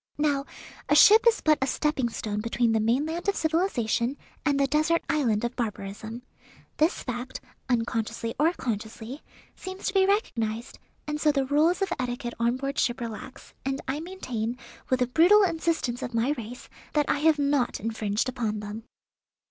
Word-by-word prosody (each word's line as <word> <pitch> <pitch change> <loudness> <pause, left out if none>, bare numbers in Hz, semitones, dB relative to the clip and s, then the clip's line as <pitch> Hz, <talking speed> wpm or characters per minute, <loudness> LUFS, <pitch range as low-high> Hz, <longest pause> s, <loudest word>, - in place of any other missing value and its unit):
Now 290 -2 +1 0.4
a 295 - +5
ship 435 +9 +8
is 460 - +4
but 305 -1 +3
a 265 - +2
stepping 275 -3 0
stone 210 -2 -3
between 230 +1 +1
the 220 - +2
mainland 295 - 0
of 400 - +2
civilization 285 - 0 0.3
and 285 -2 +2
the 275 - +4
desert 310 +4 +2
island 240 -9 +1
of 240 - -3
barbarism. 220 +1 -5 0.5
This 315 +3 +2
fact, 250 0 -5 0.3
unconsciously 230 -1 -1
or 315 +3 +4
consciously, 225 - -5 0.3
seems 375 0 -8
to 390 - 0
be 385 -1 +4
recognized, 230 - -1 0.3
and 300 0 -3
so 305 - +4
the 275 -2 0
rules 310 +7 +3
of 390 - -1
etiquette 245 -1 -3
on 235 +2 +2
board 275 +1 -3
ship 240 +1 +1
relax, 235 +2 -8
and 270 0 -2
I 270 +3 -1
maintain, 250 -10 -4 0.3
with 255 -1 +1
the 250 - +3
brutal 355 - +6
insistance 325 -8 0
of 240 - -4
my 235 +5 +2
race, 245 -3 -6 0.3
that 295 -1 +2
I - - +1
have 315 0 +4
not 280 -3 +1
infringed 220 0 -1
upon 230 -4 -2
them." 210 +2 -7
260 Hz, 170 wpm, -27 LUFS, 230-305 Hz, 0.5 s, ship